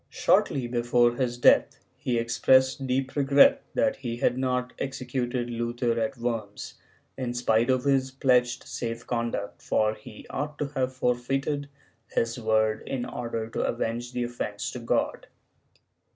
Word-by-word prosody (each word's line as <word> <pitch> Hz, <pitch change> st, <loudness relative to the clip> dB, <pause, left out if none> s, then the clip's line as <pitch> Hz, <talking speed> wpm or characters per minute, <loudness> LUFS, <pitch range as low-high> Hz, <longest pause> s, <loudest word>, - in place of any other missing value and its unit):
^ -, -, -41 dB
Shortly 130 Hz, -3 st, +2 dB
before 120 Hz, 0 st, +2 dB
his 120 Hz, -1 st, -1 dB
death, 120 Hz, -, +4 dB, 0.2 s
he 120 Hz, -2 st, -1 dB
expressed 130 Hz, +3 st, +3 dB
deep 130 Hz, +1 st, -1 dB
regret 145 Hz, -, +5 dB
that 275 Hz, -, +2 dB
he 120 Hz, -3 st, -4 dB
had 120 Hz, -, +2 dB
not 125 Hz, -1 st, -1 dB
executed 125 Hz, -2 st, -2 dB
Luther 120 Hz, +1 st, -1 dB
at 110 Hz, +3 st, -2 dB
Worms, 115 Hz, -4 st, -4 dB, 0.5 s
in 120 Hz, -2 st, -3 dB
spite 120 Hz, 0 st, +2 dB
of 130 Hz, -1 st, +2 dB
liis 135 Hz, -2 st, +2 dB
pledged 125 Hz, -2 st, +2 dB
safe 115 Hz, -1 st, -5 dB
conduct, 115 Hz, -4 st, -3 dB
for 110 Hz, 0 st, +1 dB
he 110 Hz, +1 st, -12 dB
ought 150 Hz, +1 st, -4 dB
to 145 Hz, -, -2 dB
have 130 Hz, -2 st, -1 dB
forfeited 135 Hz, +4 st, -1 dB, 0.4 s
his 115 Hz, +1 st, -1 dB
word 110 Hz, -1 st, +1 dB
in 125 Hz, -2 st, -2 dB
order 115 Hz, -2 st, -4 dB
to -, -, -3 dB
avenge 120 Hz, +1 st, -2 dB
the 125 Hz, -, -1 dB
offence 120 Hz, 0 st, -4 dB
to -, -, -6 dB
God. -, -, -1 dB
120 Hz, 150 wpm, -27 LUFS, 115-130 Hz, 0.5 s, regret